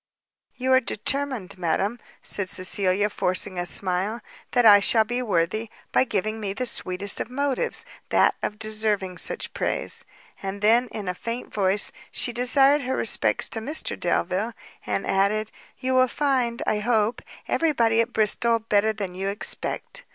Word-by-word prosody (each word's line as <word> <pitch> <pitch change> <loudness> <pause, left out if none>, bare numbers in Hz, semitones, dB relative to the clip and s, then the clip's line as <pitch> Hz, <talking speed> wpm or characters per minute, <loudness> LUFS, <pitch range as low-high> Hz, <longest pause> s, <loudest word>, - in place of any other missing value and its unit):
"You 260 +1 +1
are 260 - +7
determined, 245 -5 -3
madam," 195 +7 -1 0.2
said 195 -2 -1
Cecilia, 190 +2 +1
forcing 185 -2 -1
a 175 - -3
smile, 190 +6 -1 0.3
"that 245 -1 +2
I 205 -2 +9
shall 220 +2 +4
be 245 +3 -3
worthy, 210 +1 -1 0.2
by - - +3
giving 215 0 -2
me 200 -2 -3
the 255 +5 -3
sweetest 200 -4 +1
of - - -5
motives, 280 - -1 0.2
that - - +4
of 210 - -3
deserving 215 -4 -2
such - - -3
praise." - - -1 0.4
And 195 +1 -5
then, 235 +4 +4
in 210 -3 -7
a 180 - -1
faint 230 +6 -6
voice, 200 0 +4 0.2
she 240 - -1
desired 270 +4 +4
her 260 0 -2
respects - - +2
to 225 - -3
Mr 290 +8 -1
Delvile, 185 +5 -1 0.3
and 100 -1 -1
added, 205 +3 +1 0.3
"you 260 0 -2
will 255 0 +4
find, 255 -4 0
I 210 - +1
hope, 220 0 +1 0.3
every 330 -1 +1
body 230 -4 +3
at 230 +1 -3
Bristol 230 +1 +3
better 220 -1 +1
than 200 -4 -5
you 190 +2 -4
expect." 205 - -3
215 Hz, 160 wpm, -24 LUFS, 195-245 Hz, 0.4 s, I